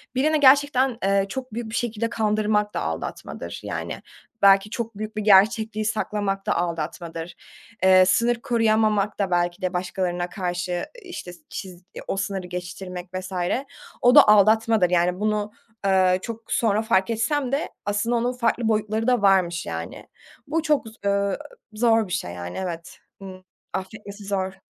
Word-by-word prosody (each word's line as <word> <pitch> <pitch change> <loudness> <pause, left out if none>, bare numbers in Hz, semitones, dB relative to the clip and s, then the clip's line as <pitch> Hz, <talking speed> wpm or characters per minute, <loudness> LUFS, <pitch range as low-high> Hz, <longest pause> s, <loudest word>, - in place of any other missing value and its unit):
birini 305 +4 +2
gerçekten, 270 -2 +4
eee, 195 0 +2
çok 255 +2 -6
büyük 230 0 -4
bir 220 - -5
şekilde 230 -2 -1
kandırmak 210 -2 0
da - - -2
aldatmadır, - - -5
yani, - - -5 0.4
belki 195 +1 +6
çok 230 -1 -5
büyük 215 +1 -6
bir - - 0
gerçekliği 215 +2 +4
saklamak 205 -2 -2
da 210 - +1
aldatmadır. 170 0 -4 0.5
Eee, 185 0 +7
sınır 235 +6 +3
koruyamamak 220 -3 +1
da 195 -2 0
belki 175 +1 0
de 185 0 -2
başkalarına 180 -1 -2
karşı, 180 -1 -3 0.2
işte, 355 - -8 0.2
çiz 185 -2 -8 0.2
o - - -2
sınırı 195 -2 -3
geçiştirmek 180 0 -7
vs. 185 +1 -5 0.7
o 245 +1 +5
da - - +9
aldatmadır, 215 -1 +4
yani, 180 +1 +1
bunu, 210 0 -1 0.3
eee, 185 -1 +3
çok 230 +1 -8
sonra 215 -2 +2
fark 205 -3 +1
etsem 245 +4 0
de 280 +4 -1 0.2
aslında 205 +4 0
onun 240 +1 +1
farklı 235 -1 0
boyutları 215 +1 0
da 250 -3 +3
varmış, 185 -4 +3
yani. - - -6 0.4
Bu 320 +3 0
çok 300 -6 +1
z 220 - -11
ııı, 200 -1 +1 0.4
zor 225 -1 +3
bir 180 - -5
şey, 180 - -2
yani, 90 0 -7
evet, 170 -3 -6 0.2
ııı, 185 -1 -10 0.3
affetmesi 200 +2 -7
zor. 190 -1 -2
205 Hz, 155 wpm, -24 LUFS, 185-225 Hz, 0.7 s, da